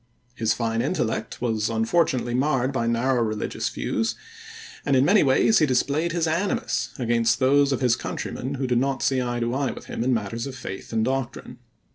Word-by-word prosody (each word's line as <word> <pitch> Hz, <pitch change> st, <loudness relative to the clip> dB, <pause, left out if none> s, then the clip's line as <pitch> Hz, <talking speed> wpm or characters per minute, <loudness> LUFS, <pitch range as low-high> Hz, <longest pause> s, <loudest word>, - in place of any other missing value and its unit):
His 110 Hz, -3 st, 0 dB
fine 115 Hz, -1 st, -1 dB
intellect 130 Hz, -6 st, -2 dB
was 110 Hz, -2 st, 0 dB
unfortunately 120 Hz, +2 st, +1 dB
marred 135 Hz, 0 st, +1 dB
by 115 Hz, -3 st, 0 dB
narrow 120 Hz, +2 st, +1 dB
religious 110 Hz, -2 st, -2 dB
views, 225 Hz, -, -2 dB, 0.7 s
and 140 Hz, -, +2 dB
in 130 Hz, +1 st, +4 dB
many 205 Hz, +5 st, +5 dB
ways 140 Hz, +10 st, +4 dB
he 155 Hz, -, +3 dB
displayed 145 Hz, +6 st, +1 dB
his 165 Hz, 0 st, 0 dB
animus 170 Hz, +5 st, -1 dB
against 115 Hz, -2 st, +2 dB
those 140 Hz, +2 st, +3 dB
of 135 Hz, -, -1 dB
his 125 Hz, -2 st, +3 dB
countrymen 130 Hz, +3 st, -4 dB
who 135 Hz, 0 st, -2 dB
did 125 Hz, -1 st, +2 dB
not 135 Hz, +1 st, -1 dB
see 130 Hz, -1 st, +2 dB
eye 120 Hz, -1 st, -2 dB
to 120 Hz, 0 st, -1 dB
eye 135 Hz, 0 st, 0 dB
with -, -, -8 dB
him -, -, -4 dB
in 130 Hz, -, +1 dB
matters 115 Hz, +1 st, -2 dB
of 135 Hz, -, -7 dB
faith 95 Hz, -6 st, -7 dB
and 110 Hz, -1 st, +1 dB
doctrine. 130 Hz, -2 st, -3 dB
130 Hz, 190 wpm, -24 LUFS, 115-140 Hz, 0.7 s, many